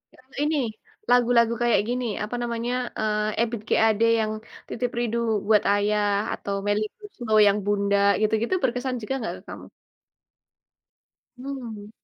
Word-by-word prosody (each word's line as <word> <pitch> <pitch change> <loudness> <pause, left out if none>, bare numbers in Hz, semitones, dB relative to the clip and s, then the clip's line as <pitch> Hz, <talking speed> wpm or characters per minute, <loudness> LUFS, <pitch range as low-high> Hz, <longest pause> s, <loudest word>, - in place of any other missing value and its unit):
Yang 260 - -23
ini, 305 0 +1 0.5
lagu-lagu 235 -1 +4
kayak 240 -1 +3
gini 250 0 -1 0.2
apa 220 +3 -4
namanya, 235 0 -2 0.3
eee, 210 0 0
Ebiet 235 -2 -1
G - - -9 0.2
Ade 220 +1 +2 0.2
yang 215 0 -1 0.4
Titip 245 +1 -3
Rindu 235 -1 -1 0.3
Buat 215 -1 +4
Ayah 205 0 +2 0.3
atau 200 - -4
Melly 205 +1 +1 0.2
Goeslaw 240 - -2
yang 200 +1 +3
Bunda 200 0 +1 0.2
gitu-gitu 220 - +1
berkesan 250 +1 -1
juga 240 +5 -3
nggak 225 - -3
ke - - -14
kamu? - - -9 1.7
Mmm. 245 -6 -7
230 Hz, 140 wpm, -25 LUFS, 210-245 Hz, 1.7 s, lagu-lagu